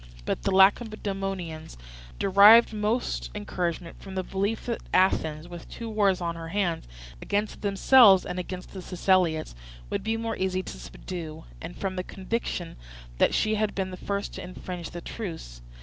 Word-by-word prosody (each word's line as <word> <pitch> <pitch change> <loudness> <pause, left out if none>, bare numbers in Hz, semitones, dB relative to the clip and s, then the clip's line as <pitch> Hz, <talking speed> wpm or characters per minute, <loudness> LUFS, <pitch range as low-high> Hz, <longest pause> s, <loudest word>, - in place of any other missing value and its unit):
But - - -2
the 195 - 0
Lacedaemonians 195 - +1 0.4
derived 205 +4 +7
most 210 - -1
encouragement 170 - -4
from 195 -1 -9
the 185 - -1
belief 200 +4 -2
that 235 -2 -3
Athens, 160 -4 +2
with 175 -1 -10
two 230 -1 -6
wars 200 -3 +2
on 170 -1 -2
her 165 0 -7
hands, 175 - -1 0.3
against 205 +1 -2
themselves 200 0 +6
and 180 0 -4
against 180 0 -7
the 190 - -6
Siceliots, 180 - +1 0.4
would - - -2
be 220 +2 0
more 225 -1 -3
easy 185 0 -1
to - - -8
subdue, 160 -3 -7 0.2
and 165 +2 -8
from 190 -1 -3
the 185 - -1
conviction 190 -3 -4 0.4
that - - +4
she 215 - +2
had 215 -1 0
been 190 -1 -2
the - - -5
first 200 +2 -3
to - - -6
infringe 180 -1 -7
the 175 - -7
truce. 165 - -7
190 Hz, 165 wpm, -27 LUFS, 175-205 Hz, 0.4 s, derived